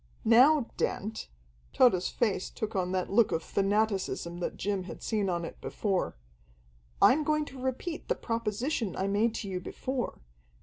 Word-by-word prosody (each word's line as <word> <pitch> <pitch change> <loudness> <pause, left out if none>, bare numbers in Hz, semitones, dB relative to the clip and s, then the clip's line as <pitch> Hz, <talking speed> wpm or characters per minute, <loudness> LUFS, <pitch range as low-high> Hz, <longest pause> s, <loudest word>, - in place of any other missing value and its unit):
"Now, 255 +4 +6
Dent" 220 +3 -2 0.5
Tode's 185 -8 +4
face 210 -6 0
took 220 0 -5
on 180 -1 0
that 185 0 -1
look 220 +2 +4
of 165 - -1
fanaticism 195 -4 0
that 175 - -3
Jim 195 -1 -2
had - - -9
seen 210 -4 0
on 170 -1 -1
it - - -9
before 195 - -1 0.8
"I'm 300 +4 +6
going 305 0 +1
to 265 -2 -10
repeat 265 +6 -3
the - - +1
proposition 230 - -2
I 190 - -1
made 215 +3 +1
to 205 - -4
you 185 -2 -3
before. 255 +7 -4
215 Hz, 160 wpm, -30 LUFS, 190-245 Hz, 0.8 s, Now